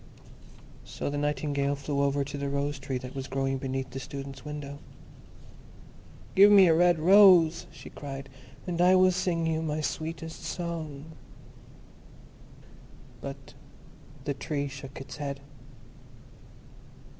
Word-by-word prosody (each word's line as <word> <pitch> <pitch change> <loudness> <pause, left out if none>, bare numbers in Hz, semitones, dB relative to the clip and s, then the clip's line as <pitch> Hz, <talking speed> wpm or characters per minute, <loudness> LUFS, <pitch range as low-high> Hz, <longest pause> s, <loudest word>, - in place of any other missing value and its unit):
So - - -5
the 145 - -3
Nightingale 145 -1 0
flew 140 0 -2
over 140 0 +1
to 145 +1 -7
the 140 0 -3
Rose 140 0 -2
tree 135 -1 -3
that 125 0 -8
was 135 -1 -5
growing 135 0 -1
beneath 130 0 -4
the 135 - -5
Student's 135 -1 -8
window. 145 -1 -7 1.5
"Give 200 +2 +8
me 200 -2 +8
a 165 - +5
red 175 +1 +4
rose," 175 -1 +6
she - - -12
cried, 135 -1 -7 0.4
"and 175 -1 -2
I 180 +1 +6
will 185 0 +5
sing 180 -2 -1
you 160 0 0
my 155 -1 -2
sweetest 160 +1 -5
song." 160 -3 -5 2.1
But - - -8 0.7
the 145 - -1
Tree 140 +1 -3
shook 135 -1 -9
its 135 +2 -9
head. 140 -2 -4
145 Hz, 130 wpm, -28 LUFS, 140-165 Hz, 2.1 s, Give